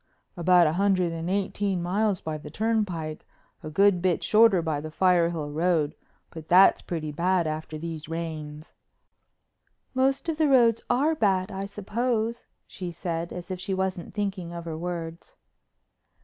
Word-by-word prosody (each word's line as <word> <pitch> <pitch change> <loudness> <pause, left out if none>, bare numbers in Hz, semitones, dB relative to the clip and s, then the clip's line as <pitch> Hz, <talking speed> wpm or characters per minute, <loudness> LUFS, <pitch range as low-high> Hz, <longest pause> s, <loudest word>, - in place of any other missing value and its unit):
"About 175 0 +5
a 155 - +2
hundred 185 -2 +2
and 165 +1 -4
eighteen 195 0 -1
miles 200 +2 0
by 155 -1 -4
the - - -10
turnpike—a 185 -9 -4
good 195 +2 +3
bit 180 -2 +1
shorter 215 -3 +5
by 155 -3 -1
the 155 - -6
Firehill 170 -3 +1
Road, 160 -2 +1 0.4
but 160 -2 -10
that's 185 +2 +6
pretty 160 -4 -4
bad 175 +3 +1
after 155 0 -4
these 160 -1 -6
rains. 155 -2 -6 1.2
"Most 270 +3 +1
of 325 -1 -2
the 310 - +4
roads 235 -5 +4
are 280 +6 +2
bad, 195 -10 +1
I 195 0 -4
suppose," 225 +3 -2 0.2
she 180 -2 -7
said, 170 0 -4
as 180 +1 -7
if 185 - -4
she 190 +1 -2
wasn't 190 -1 -3
thinking 195 -4 -3
of 170 -1 -7
her 165 -1 -4
words. 170 0 -6
180 Hz, 150 wpm, -26 LUFS, 165-200 Hz, 1.2 s, that's